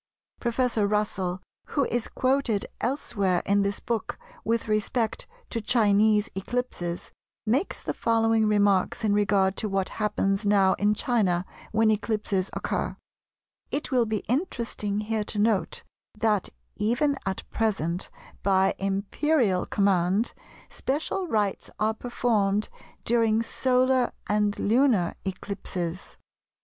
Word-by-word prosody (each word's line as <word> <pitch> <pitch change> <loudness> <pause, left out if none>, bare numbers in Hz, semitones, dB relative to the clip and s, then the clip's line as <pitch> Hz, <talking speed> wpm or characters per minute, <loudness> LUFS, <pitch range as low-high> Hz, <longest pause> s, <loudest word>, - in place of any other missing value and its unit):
Professor 235 -3 +1
Russell, 190 -3 -1 0.3
who 280 - +4
is 240 -1 -1
quoted 255 -5 +1
elsewhere 205 -8 0
in 200 0 +3
this 200 0 -1
work 230 -2 -2 0.3
with 230 0 0
respect 215 +2 -1 0.2
to 230 - -2
Chinese 215 -1 +3
eclipses, 195 -4 -3 0.3
makes 255 - 0
the - - -2
following 225 -1 +2
remarks 205 -1 +2
in 210 -2 +2
regard 200 -2 +2
to 215 - -2
what 195 -1 0
happens 200 -1 +1
now 200 -2 +4
in 210 +1 +3
China 195 -7 +1 0.3
when 220 0 +4
eclipses 210 -3 -1
occur:—"It 290 - -5
will 245 -3 +3
be 215 -1 -2
interesting 235 - -1
here 215 0 -1
to 210 - -5
note 210 -1 +1 0.3
that, 210 -3 +1 0.3
even 245 +7 +1
at 190 - -3
present, 190 -6 -1 0.3
by 190 -1 +3
Imperial 200 +2 +1
command, 195 +2 +2 0.3
special 315 +7 -2
rites 210 - -1
are 215 +1 +1
performed 215 -4 0 0.4
during 225 -1 +3
solar 255 +1 +2
and 210 0 +1
lunar 225 -5 +3
eclipses. 185 -2 -5
210 Hz, 115 wpm, -26 LUFS, 195-235 Hz, 0.4 s, who